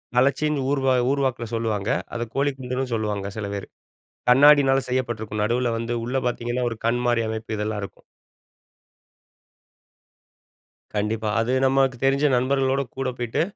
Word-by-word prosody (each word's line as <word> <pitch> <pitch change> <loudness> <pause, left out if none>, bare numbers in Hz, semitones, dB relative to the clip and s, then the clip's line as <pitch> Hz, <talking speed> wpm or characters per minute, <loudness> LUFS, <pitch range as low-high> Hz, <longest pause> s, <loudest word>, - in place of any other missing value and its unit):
கலச்சின்னு 140 +2 +2
ஊர் 140 -2 +1 0.3
ஊர்வாக்கில 130 -4 0
சொல்லுவாங்க. 110 -3 -1 0.2
அத 120 - -3
கோழிக்குண்டுன்னு 130 -2 -2
சொல்லுவாங்க 105 -3 -2
சில 100 -2 -3
பேர் 100 - -5 0.6
கண்ணாடியினால 135 0 +6
செய்யப்பட்டிருக்கும் 110 -4 -2
நடுவில 120 +2 +1
வந்து 115 +1 -3
உள்ள 125 +3 -1
பார்த்தீங்கன்னா 120 +1 -2
ஒரு 115 - -5
கண் 120 +1 +1
மாதிரி 120 -1 +2
அமைப்பு 110 0 -4
இதெல்லாம் 105 0 -2
இருக்கும். - - -10 2.9
கண்டிப்பா 105 +1 -1
அது 115 +2 0
நமக்கு 135 -1 +2
தெரிஞ்ச 140 +2 +3
நண்பர்களோடு 135 +1 +1
கூட 135 -1 -1
போயிட்டு, 120 +4 -1
120 Hz, 125 wpm, -24 LUFS, 110-135 Hz, 2.9 s, கண்ணாடியினால